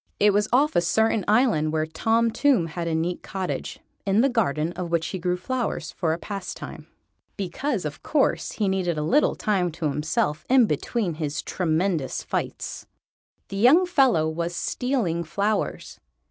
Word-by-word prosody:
It 205 0 +5
was 205 +1 +2
off 290 +5 +3
a - - +5
certain 220 +4 +2
island 210 -9 +3
where 155 0 0
Tom 225 +8 +1
Tomb 270 -8 +3
had 170 +1 -4
a 165 - 0
neat 170 +2 -1
cottage, 190 -2 -4 0.3
in 200 +2 +3
the 275 - +3
garden 165 - 0
of 180 -1 -5
which 165 -1 0
he 190 - -4
grew 180 +1 0
flowers 245 +4 -3
for 165 -3 -1
a 160 - 0
pastime. 195 +1 -7 0.5
Because, 200 - -2
of 150 - -5
course, 295 -3 0
he 210 - 0
needed 185 -4 0
a 150 - -1
little 280 - +3
time 185 -5 0
to 155 -2 -2
himself 150 +1 -1
in 255 -2 +6
between 190 - -1
his 145 -1 -2
tremendous 165 -4 -1
fights. - - -4 0.6
The 195 - -5
young 270 - +6
fellow 265 - +3
was 170 +2 -3
stealing 220 -9 -1
flowers. 205 +6 -2
185 Hz, 165 wpm, -25 LUFS, 165-230 Hz, 0.6 s, in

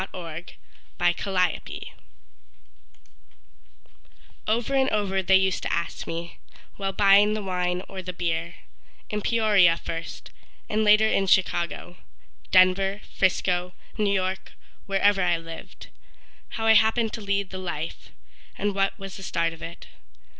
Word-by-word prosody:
Aner 165 -2 -6 0.6
Clute 180 -1 0 2.6
Over 230 +5 0
and 270 -1 +3
over 195 -2 0
they 190 +1 +4
used 190 -1 +2
to - - -3
ask 170 - -3
me, 170 +1 -6 0.4
While 195 -1 -2
buying 205 +2 +5
the 215 - -4
wine 180 -1 -1
or 190 -1 -7
the 180 0 -5
beer, 170 -1 -3 0.6
In 210 0 -2
Peoria 205 -7 +4
first, 165 0 -7 0.4
and 215 +1 0
later 215 +1 +5
in 195 -2 +1
Chicago, 175 0 0 0.5
Denver, 195 +2 +4
Frisco, 180 -1 0 0.2
New 210 -2 +1
York, 190 -1 -2 0.3
wherever 195 0 +3
I 175 -2 +2
lived 165 0 -10 0.6
How 225 - -4
I 225 - +7
happened 220 +1 +3
to 225 - -5
lead 200 -1 -1
the 190 - -5
life, 165 -3 -5 0.5
And 205 0 -1
what 195 0 0
was 195 -1 -8
the - - -10
start 165 -3 -1
of 165 - -14
it. 170 +1 -8
190 Hz, 130 wpm, -25 LUFS, 175-205 Hz, 2.6 s, I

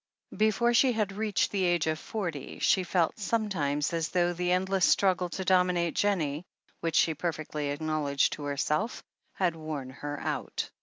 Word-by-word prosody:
Before 220 +3 +2
she 250 +1 +4
had 215 -3 0
reached 210 0 0
the 195 -2 0
age 175 -2 +2
of 155 -1 -1
forty 170 -11 -5
she 190 - +3
felt 175 +1 0
sometimes 170 -10 0
as 165 -1 -1
though 175 -1 +1
the 180 +1 -1
endless 190 +1 +1
struggle 185 -2 +3
to 190 +2 -5
dominate 180 -2 +2
Jennie, 165 -7 0 0.4
which 165 -1 -2
she 160 - +4
perfectly 155 -2 -3
acknowledged 145 -1 0
to 145 - -6
herself, 150 - -1 0.3
had 180 -4 0
worn 155 -5 -5
her 145 +2 -6
out. - - -3
175 Hz, 160 wpm, -29 LUFS, 155-195 Hz, 0.4 s, she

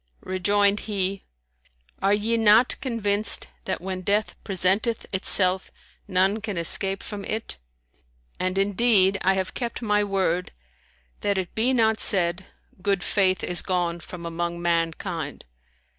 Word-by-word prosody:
Rejoined 200 +2 +1
he, 195 -1 -2 0.8
"Are 195 - +2
ye 210 +3 +1
not 225 +2 +4
convinced 215 -4 +1 0.2
that - - -3
when 185 0 -5
death 205 +3 0
presenteth 200 +4 0
itself, 190 -1 +3 0.4
none 190 +4 +1
can 205 -3 -5
escape 190 +3 +3
from 205 -2 -7
it? 220 - -5 0.8
And 185 +1 -2
indeed, 195 -1 +3
I 190 +1 +2
have 190 -1 -3
kept 240 -2 -4
my 210 -1 +2
word, 185 -3 -1 0.7
that 200 -1 -1
it 185 -2 -4
be 235 +4 +1
not 220 -3 +2
said, 180 -1 +3 0.3
Good 195 -1 0
faith 185 -3 +1
is 175 - 0
gone 175 -2 -1
from 170 0 -10
among 170 +1 -4
mankind.' 165 -2 -2
195 Hz, 130 wpm, -24 LUFS, 180-210 Hz, 0.8 s, not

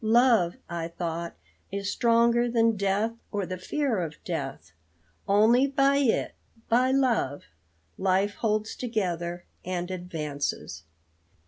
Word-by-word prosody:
Love, 225 -5 +4
I 170 -1 -3
thought, 170 0 -4 0.4
is 200 0 -2
stronger 235 +1 +3
than 230 -1 +3
death 200 +3 +1 0.2
or 205 -2 -1
the 185 0 -5
fear 265 +1 -1
of 160 -3 -4
death. - - -5 0.6
Only 225 +6 +5
by 275 0 +3
it, 270 -5 +1 0.4
by 250 +3 +4
love, 250 - +1 0.6
life 195 +2 +2
holds 215 0 -1
together 175 -7 -2 0.2
and 180 0 -3
advances. 150 - -4
205 Hz, 115 wpm, -27 LUFS, 175-235 Hz, 0.6 s, Only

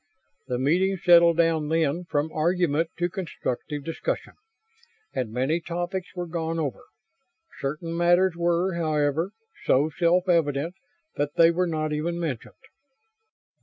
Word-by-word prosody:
The 125 - -1
meeting 180 +9 +2
settled 170 -2 +6
down, 165 -3 +2
then, 165 +1 0
from 150 -1 -1
argument 165 -1 +1
to 175 - +1
constructive 150 -5 -4
discussion, 165 - -3 0.8
and 120 -4 -2
many 130 +8 0
topics 175 +3 -4
were 180 -1 -3
gone 165 -1 -3
over. 150 -5 -3 0.7
Certain 155 +4 -3
matters 175 +2 +3
were, 170 +2 +1
however, 155 0 0 0.4
so 145 +4 +3
self 180 +2 +2
evident 165 -2 +1 0.4
that 145 0 -1
they 165 0 +6
were 180 +2 0
not 155 -2 -2
even 170 +3 -2
mentioned. 150 -9 -4
165 Hz, 130 wpm, -25 LUFS, 150-175 Hz, 0.8 s, settled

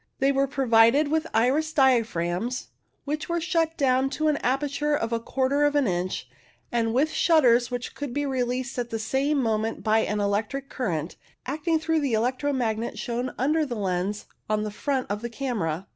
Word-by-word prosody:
They 270 +1 +3
were 275 0 +2
pro 270 0 -2
vided 230 +6 +5
with 320 +1 0
iris 275 +8 +2
diaphragms, 230 - +1 0.4
which 300 +4 -3
were 340 0 0
shut 330 -1 0
down 265 -1 +2
to 310 +1 +2
an 295 - +1
aperture 290 +3 0
of 230 -4 -2
a 230 - +1
quarter 265 +4 0
of 290 0 +2
an 290 -2 +3
inch, 180 -2 -2 0.4
and 230 -1 +1
with 280 +7 +2
shutters 250 -10 +4
which 245 -1 -4
could 285 -3 -5
be 290 +3 -1
released 255 -1 -2
at 240 -1 -3
the 225 - -2
same 265 +7 0
moment 220 0 -1
by 220 0 +3
an 210 -1 -1
electric 215 +7 -1
current, 170 - -3 0.3
acting 310 +4 0
through 320 0 0
the 280 -5 -1
electro 255 +6 0
magnet 230 -4 -2
shown 245 +1 -3
under 305 +5 +2
the 260 -5 -3
lens 195 0 -2 0.2
on 215 0 +1
the 210 - -3
front 265 +4 -1
of 205 +1 -3
the 235 - -4
camera. 210 - -3
255 Hz, 190 wpm, -26 LUFS, 225-285 Hz, 0.4 s, vided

